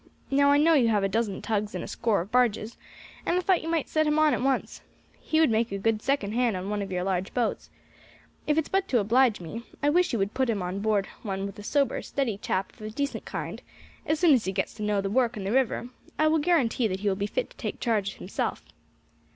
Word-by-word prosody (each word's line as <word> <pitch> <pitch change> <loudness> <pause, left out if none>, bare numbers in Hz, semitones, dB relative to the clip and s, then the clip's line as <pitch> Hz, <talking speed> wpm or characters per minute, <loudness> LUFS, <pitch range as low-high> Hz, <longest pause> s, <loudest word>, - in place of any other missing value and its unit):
Now 280 +1 +4
I 285 - +5
know 320 +3 +5
you 265 -7 +4
have 210 -3 +2
a - - +3
dozen 210 -1 -2
tugs 210 -1 -1
and - - -3
a - - -6
score 225 -6 0
of 190 +5 -8
barges, 235 -2 +1 0.5
and 350 - +1
I - - +3
thought 365 0 +2
you 325 - -5
might 330 -3 0
set 310 -1 +1
him 300 0 +2
on 310 -1 +4
at - - -1
once. 265 0 -1 0.4
He 315 - 0
would 320 -6 +4
make 225 0 +1
a 200 - -2
good 215 +2 0
second 270 -7 0
hand 235 -3 +1
on 190 +3 -4
one 210 -1 -1
of 195 -1 -5
your 180 -1 -1
large 185 0 -2
boats. 245 -2 -1 0.8
If 300 0 +2
it's 320 - +1
but 385 0 0
to 260 - +2
oblige 235 +2 +3
me, 180 +7 -7 0.2
I 290 - +4
wish 360 +3 +3
you 235 - 0
would 195 0 -1
put 260 -2 0
him 205 -5 0
on 180 +2 -3
board 205 -1 +1 0.2
one 195 -2 -3
with 200 +1 -7
a - - -8
sober, 280 +5 +1
steady 240 -8 -2
chap 190 -1 -2
of - - -19
a 215 - -5
decent 280 +6 -3
kind; - - -5 0.5
as 310 0 +1
soon 340 -3 +6
as 245 -5 +2
he 190 - -1
gets 190 0 -2
to - - -11
know 210 -1 +1
the 195 0 -3
work 245 -1 +1
and 195 - -5
the 195 - -1
river, 250 -1 +1 0.3
I 310 - +3
will 320 0 +3
guarantee 280 -8 +2
that 190 -1 -4
he 210 - -1
will 195 - +2
be 200 +1 -2
fit - - -3
to - - -19
take - - -5
charge 210 -5 0
himself." 190 - -3
225 Hz, 260 wpm, -27 LUFS, 200-280 Hz, 0.8 s, soon